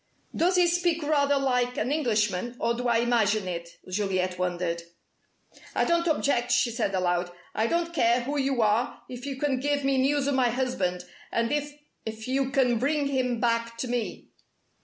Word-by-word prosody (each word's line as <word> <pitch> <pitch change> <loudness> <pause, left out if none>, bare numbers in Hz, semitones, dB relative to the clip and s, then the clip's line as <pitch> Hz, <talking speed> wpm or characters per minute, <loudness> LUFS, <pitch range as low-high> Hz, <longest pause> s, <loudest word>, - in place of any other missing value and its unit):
"Does 360 +3 +2
he 360 -1 +5
speak 345 -2 +1
rather 285 -1 +2
like 250 -2 0
an 245 +5 -1
Englishman, 235 -6 0
or 235 - +1
do 245 +1 -2
I 235 -1 +3
imagine 220 -4 +2
it?" 170 -1 -6
Juliet 185 -1 -1
wondered. 175 -2 -1 0.9
"I - - +2
don't 340 0 +2
object," 280 -6 +1
she 245 0 +3
said 220 -4 -1
aloud. 175 -1 0 0.2
"I 220 - +1
don't 340 +4 -1
care 240 -5 +3
who 285 +4 -2
you 265 -3 +1
are 215 +3 0
if 250 +2 -7
you 275 - -3
can 270 -1 0
give 285 +1 0
me 270 -1 +2
news 280 +1 +2
of 285 - +1
my 255 -2 +3
husband, 225 -8 -1 0.3
and 230 0 0
if 295 0 -1 0.3
if 220 0 -6
you 265 +1 0
can 255 -4 +2
bring 285 +2 +1
him 250 -3 0
back 230 0 0
to 255 - -3
me." 240 -2 -3
245 Hz, 180 wpm, -27 LUFS, 220-280 Hz, 0.9 s, he